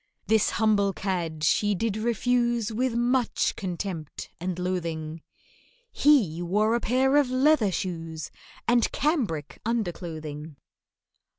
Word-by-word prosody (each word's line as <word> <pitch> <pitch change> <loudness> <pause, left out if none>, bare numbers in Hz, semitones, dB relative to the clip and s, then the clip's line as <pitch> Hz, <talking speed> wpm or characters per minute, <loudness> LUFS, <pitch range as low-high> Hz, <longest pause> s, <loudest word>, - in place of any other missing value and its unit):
This 220 -1 +3
humble 205 -3 +3
cad 170 -6 -3
she 205 +6 +2
did 215 +2 -1
refuse 235 0 +1
With 245 +2 -1
much 240 0 +1
contempt 175 -4 -5
and 180 0 -3
loathing, 165 -3 -3 0.7
He 215 - +3
wore 210 +6 +1
a 235 - +2
pair 260 +4 +2
of 285 -3 +3
leather 255 -4 +3
shoes 165 -4 -4 0.4
And 240 -1 +3
cambric 235 - -1
underclothing! 165 -9 -4
205 Hz, 110 wpm, -26 LUFS, 170-240 Hz, 0.7 s, This